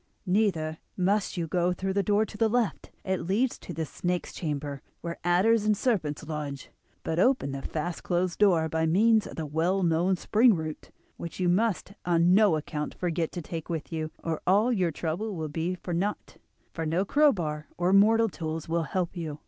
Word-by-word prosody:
Neither 180 Hz, -5 st, +1 dB, 0.2 s
must 195 Hz, +1 st, +1 dB
you 170 Hz, -, -1 dB
go 175 Hz, +2 st, +1 dB
through 190 Hz, +2 st, -3 dB
the 200 Hz, -, +2 dB
door 205 Hz, +2 st, +2 dB
to 215 Hz, -, -12 dB
the 220 Hz, +1 st, +2 dB
left, 240 Hz, -1 st, -1 dB, 0.2 s
it 190 Hz, -1 st, -1 dB
leads 235 Hz, +7 st, +1 dB
to -, -, -9 dB
the 160 Hz, -1 st, -3 dB
snake's 175 Hz, +3 st, -3 dB
chamber, 145 Hz, -3 st, -4 dB, 0.2 s
where 170 Hz, 0 st, -5 dB
adders 200 Hz, +6 st, +3 dB
and 210 Hz, -1 st, +2 dB
serpents 180 Hz, -, 0 dB
lodge; 150 Hz, -3 st, -5 dB, 0.3 s
but 160 Hz, +1 st, -1 dB
open 250 Hz, -, +2 dB
the 135 Hz, 0 st, -5 dB
fast 165 Hz, +4 st, -4 dB
closed 175 Hz, 0 st, -1 dB
door 175 Hz, -6 st, +4 dB
by 160 Hz, +1 st, 0 dB
means 215 Hz, +6 st, +4 dB
of -, -, -9 dB
the 160 Hz, -, -3 dB
well 170 Hz, +6 st, 0 dB
known 175 Hz, +3 st, +2 dB
spring 220 Hz, +5 st, +4 dB
root, 155 Hz, -2 st, -6 dB, 0.3 s
which 170 Hz, -, -7 dB
you 180 Hz, -, +1 dB
must 200 Hz, +1 st, +1 dB
on 175 Hz, 0 st, +3 dB
no 200 Hz, -4 st, +5 dB
account 150 Hz, 0 st, -4 dB
forget 170 Hz, -2 st, -1 dB
to 175 Hz, -, -5 dB
take 165 Hz, +1 st, -6 dB
with 165 Hz, -1 st, -4 dB
you, 155 Hz, -1 st, -2 dB
or 165 Hz, -1 st, -2 dB
all 210 Hz, +7 st, +4 dB
your 185 Hz, -6 st, +1 dB
trouble 175 Hz, +7 st, -3 dB
will 160 Hz, -2 st, -4 dB
be 165 Hz, +4 st, -2 dB
for 175 Hz, 0 st, -6 dB
naught, 195 Hz, +5 st, -3 dB, 0.4 s
for 165 Hz, -, -3 dB
no 165 Hz, +5 st, 0 dB
crowbar 175 Hz, -, +2 dB
or 180 Hz, +2 st, +2 dB
mortal 225 Hz, +3 st, +5 dB
tools 160 Hz, -4 st, -5 dB
will 165 Hz, 0 st, 0 dB
help 185 Hz, -1 st, -2 dB
you. 160 Hz, -4 st, -5 dB
175 Hz, 195 wpm, -28 LUFS, 160-200 Hz, 0.4 s, no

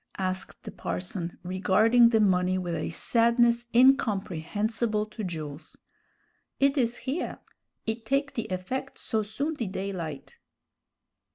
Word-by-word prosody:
asked 185 Hz, 0 st, -3 dB
the -, -, -7 dB
parson, 180 Hz, -1 st, -4 dB
regarding 210 Hz, +6 st, +4 dB
the 225 Hz, -1 st, +3 dB
money 185 Hz, -2 st, +3 dB
with 175 Hz, -2 st, -3 dB
a 160 Hz, -, -2 dB
sadness 235 Hz, 0 st, +3 dB
incomprehensible 215 Hz, -, +2 dB
to 215 Hz, +1 st, -7 dB
Jules. 155 Hz, -4 st, -6 dB, 0.8 s
"It 275 Hz, +1 st, +3 dB
is 240 Hz, -4 st, +1 dB
here; 275 Hz, +6 st, -2 dB, 0.5 s
it 225 Hz, +1 st, -3 dB
take 275 Hz, +4 st, 0 dB
the 230 Hz, -, -3 dB
effect 190 Hz, +9 st, -4 dB
so 220 Hz, -, -1 dB
soon 245 Hz, +10 st, -3 dB
the 240 Hz, -8 st, -3 dB
daylight." 185 Hz, -6 st, -5 dB
215 Hz, 120 wpm, -28 LUFS, 185-235 Hz, 0.8 s, regarding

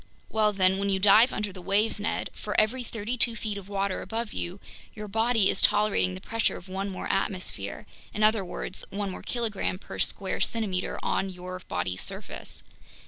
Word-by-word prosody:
Well 215 Hz, -1 st, +3 dB
then, 190 Hz, -1 st, +3 dB
when 200 Hz, 0 st, 0 dB
you 195 Hz, -, +3 dB
dive 215 Hz, +6 st, +7 dB
under 210 Hz, -2 st, -2 dB
the 185 Hz, -, -9 dB
waves, 205 Hz, +4 st, +2 dB
Ned, 205 Hz, -, -2 dB
for 210 Hz, -, 0 dB
every 225 Hz, +4 st, +2 dB
thirty 230 Hz, +1 st, -4 dB
two 230 Hz, 0 st, +4 dB
feet 215 Hz, -3 st, -3 dB
of 200 Hz, -1 st, -8 dB
water 195 Hz, -1 st, -1 dB
above 230 Hz, -1 st, -3 dB
you, 175 Hz, +3 st, -3 dB, 0.4 s
your 210 Hz, 0 st, -6 dB
body 225 Hz, 0 st, +3 dB
is -, -, +2 dB
tolerating 205 Hz, -, +3 dB
the 95 Hz, -, -8 dB
pressure 225 Hz, -1 st, 0 dB
of 175 Hz, -, -12 dB
one 195 Hz, +2 st, -3 dB
more 185 Hz, -, -5 dB
atmosphere, 185 Hz, -3 st, -2 dB, 0.3 s
in 215 Hz, -, -1 dB
other 215 Hz, -1 st, +4 dB
words, 185 Hz, +1 st, -5 dB
one 200 Hz, -1 st, -3 dB
more -, -, -7 dB
kilogram 220 Hz, -6 st, -1 dB
per -, -, -9 dB
each -, -, +3 dB
square 195 Hz, -2 st, -3 dB
centimeter 200 Hz, -5 st, 0 dB
on 195 Hz, -, 0 dB
your 185 Hz, 0 st, -7 dB
body's 90 Hz, +1 st, -1 dB
surface. -, -, -6 dB
200 Hz, 195 wpm, -28 LUFS, 190-220 Hz, 0.4 s, dive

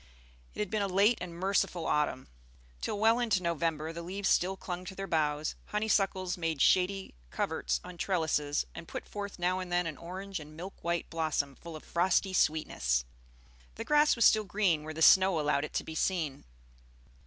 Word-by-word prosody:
It -, -, -9 dB
had 210 Hz, -, -3 dB
been 215 Hz, -1 st, 0 dB
a 200 Hz, -, +1 dB
late 200 Hz, +5 st, +3 dB
and 180 Hz, -1 st, -5 dB
merciful 185 Hz, -2 st, 0 dB
autumn. 150 Hz, -3 st, 0 dB, 0.5 s
Till 210 Hz, -, -2 dB
well 225 Hz, +2 st, +4 dB
into 220 Hz, -6 st, +1 dB
November 165 Hz, -1 st, -1 dB
the 170 Hz, -, -6 dB
leaves 190 Hz, +3 st, -2 dB
still 190 Hz, +2 st, +2 dB
clung 180 Hz, -1 st, -5 dB
to 190 Hz, -, -7 dB
their 195 Hz, -, -4 dB
boughs, 150 Hz, -3 st, 0 dB
honeysuckles 195 Hz, -4 st, 0 dB
made 165 Hz, -3 st, -1 dB
shady 190 Hz, +5 st, +2 dB, 0.2 s
coverts -, -, -1 dB
on 175 Hz, -1 st, -10 dB
trellises, 155 Hz, -6 st, 0 dB
and 165 Hz, -, -9 dB
put -, -, -6 dB
forth 200 Hz, -1 st, -6 dB
now 180 Hz, +1 st, 0 dB
and 185 Hz, -1 st, -6 dB
then 175 Hz, 0 st, +2 dB
an 155 Hz, -3 st, -4 dB
orange 190 Hz, +2 st, -6 dB
and 155 Hz, 0 st, -12 dB
milk 185 Hz, +4 st, -9 dB
white 170 Hz, 0 st, -1 dB
blossom 155 Hz, -4 st, -1 dB
full 170 Hz, +2 st, -10 dB
of 155 Hz, -, -9 dB
frosty 185 Hz, +2 st, +1 dB
sweetness; 65 Hz, -, +1 dB, 0.7 s
the -, -, -6 dB
grass 300 Hz, 0 st, +4 dB
was 235 Hz, -, +3 dB
still 215 Hz, -1 st, +6 dB
green 190 Hz, -5 st, +1 dB
where 155 Hz, 0 st, -7 dB
the 160 Hz, -, +1 dB
snow 190 Hz, -2 st, +6 dB
allowed 150 Hz, -1 st, +1 dB
it -, -, -10 dB
to -, -, -1 dB
be 160 Hz, -, -7 dB
seen. 160 Hz, -4 st, -1 dB
175 Hz, 190 wpm, -31 LUFS, 155-195 Hz, 0.7 s, still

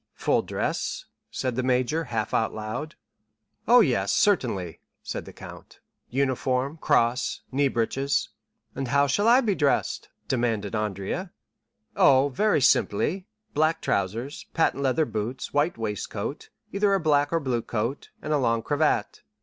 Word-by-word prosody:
"Full -, -, +1 dB
dress?" -, -, -3 dB, 0.2 s
said 130 Hz, -2 st, -3 dB
the 130 Hz, -, 0 dB
major, 130 Hz, +5 st, +1 dB
half 115 Hz, -4 st, -3 dB
aloud. 110 Hz, +7 st, -2 dB, 0.7 s
"Oh, 245 Hz, +2 st, +8 dB
yes, 115 Hz, -, +1 dB
certainly," 115 Hz, -, +1 dB, 0.2 s
said -, -, -5 dB
the -, -, -10 dB
count; -, -, -12 dB, 0.3 s
"uniform, 130 Hz, +2 st, 0 dB
cross, 120 Hz, -4 st, +1 dB
knee 140 Hz, +2 st, +2 dB
breeches." 135 Hz, +3 st, 0 dB, 0.4 s
"And 135 Hz, -, -4 dB
how 140 Hz, +3 st, +3 dB
shall 205 Hz, +10 st, +1 dB
I 245 Hz, +3 st, +6 dB
be 220 Hz, -5 st, +1 dB
dressed?" 145 Hz, -6 st, 0 dB, 0.2 s
demanded 115 Hz, -5 st, -1 dB
Andrea. 105 Hz, -, -3 dB, 0.6 s
30145m -, -, -3 dB
"Oh, 135 Hz, +1 st, +6 dB
very 205 Hz, +3 st, +2 dB
simply; 155 Hz, -, +2 dB, 0.3 s
black 155 Hz, +2 st, +2 dB
trousers, 115 Hz, +9 st, -2 dB
patent 160 Hz, -4 st, +2 dB
leather 140 Hz, +4 st, +2 dB
boots, 115 Hz, +2 st, -4 dB
white 145 Hz, +2 st, +1 dB
waistcoat, 105 Hz, -3 st, -4 dB, 0.2 s
either 200 Hz, 0 st, +3 dB
a -, -, +1 dB
black 145 Hz, -3 st, +2 dB
or 165 Hz, -, +2 dB
blue 130 Hz, -5 st, -1 dB
coat, 115 Hz, +5 st, -3 dB
and 150 Hz, -, -1 dB
a 150 Hz, -, +2 dB
long 115 Hz, -3 st, +1 dB
cravat. 145 Hz, -7 st, 0 dB
135 Hz, 140 wpm, -26 LUFS, 115-155 Hz, 0.7 s, Oh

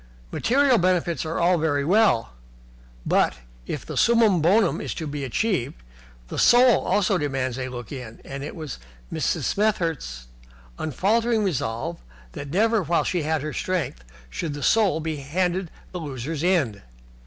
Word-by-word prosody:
Material 265 Hz, 0 st, +3 dB
comforts 175 Hz, -2 st, +1 dB
are 160 Hz, -, -3 dB
all 175 Hz, 0 st, +3 dB
very 145 Hz, -3 st, +1 dB
well, 185 Hz, -, +3 dB, 0.7 s
but, -, -, +2 dB, 0.3 s
if -, -, -4 dB
the -, -, -6 dB
summum 225 Hz, -7 st, +4 dB
bonum 195 Hz, +4 st, +3 dB
is -, -, -4 dB
to 160 Hz, -, -4 dB
be 145 Hz, -1 st, -4 dB
achieved, 140 Hz, -, -1 dB, 0.5 s
the -, -, -5 dB
Soul 245 Hz, 0 st, +6 dB
also 195 Hz, -2 st, +2 dB
demands 135 Hz, -3 st, -2 dB
a 130 Hz, 0 st, -3 dB
look 120 Hz, -3 st, -8 dB
in, 125 Hz, -5 st, -8 dB
and 140 Hz, 0 st, -6 dB
it -, -, -6 dB
was 155 Hz, -, -7 dB, 0.3 s
Mrs. -, -, -1 dB
Smethurst's 165 Hz, -, -1 dB, 0.5 s
unfaltering 220 Hz, -, +1 dB
resolve 120 Hz, -, -2 dB, 0.3 s
that 140 Hz, -, -7 dB
never 220 Hz, +6 st, +2 dB
while 170 Hz, 0 st, +1 dB
she 180 Hz, -, -1 dB
had 155 Hz, -1 st, -1 dB
her 155 Hz, -, -4 dB
strength 175 Hz, -, -2 dB, 0.3 s
should 155 Hz, -4 st, -4 dB
the 145 Hz, -, -6 dB
Soul 200 Hz, -6 st, +3 dB
be 155 Hz, -1 st, -3 dB
handed 175 Hz, +5 st, -1 dB, 0.2 s
the 180 Hz, -, -5 dB
loser's 145 Hz, +1 st, -4 dB
end. 155 Hz, -, +1 dB
165 Hz, 155 wpm, -24 LUFS, 140-195 Hz, 0.7 s, Soul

